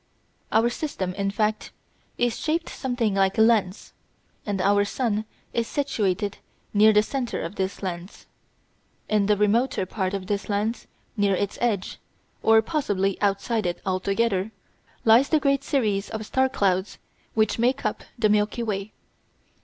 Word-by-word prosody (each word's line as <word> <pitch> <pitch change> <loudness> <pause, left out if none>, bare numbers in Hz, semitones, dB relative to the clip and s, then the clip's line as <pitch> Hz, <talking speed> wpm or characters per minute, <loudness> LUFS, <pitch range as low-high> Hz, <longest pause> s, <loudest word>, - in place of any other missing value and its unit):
Our 230 +2 +3
system, 195 - -3
in 195 +1 -1
fact, 215 +1 -1 0.5
is 240 -1 0
shaped 325 +2 -1
something 245 -5 -1
like 195 -1 +2
a - - +4
lens, 215 -4 +1 0.5
and 200 -2 -1
our 205 +2 +3
sun 215 0 -1 0.3
is 230 -1 0
situated 205 -8 -1 0.3
near 215 +1 +6
the 210 0 +4
centre 250 +1 -3
of 165 - -5
this 190 0 -3
lens. 180 0 -6 0.8
In 210 -2 +2
the 210 -1 +3
remoter 210 +1 +2
part 190 0 -2
of 190 -1 -4
this 205 +1 -3
lens, 210 +3 -1 0.3
near 200 -3 +2
its 200 +1 -3
edge, 215 -6 -1 0.4
or 220 0 +5
possibly 205 - -1
outside 205 +1 0
it 175 - -3
altogether, 195 +2 0 0.6
lies 230 +5 +6
the 310 - +4
great 275 -1 +1
series 215 -9 0
of 220 0 -5
star 260 +4 +1
clouds 190 -5 0 0.4
which 215 0 +2
make 255 +4 +1
up - - -2
the 225 -2 +3
Milky 210 +3 +1
Way. 205 -2 -3
210 Hz, 150 wpm, -25 LUFS, 195-235 Hz, 0.8 s, near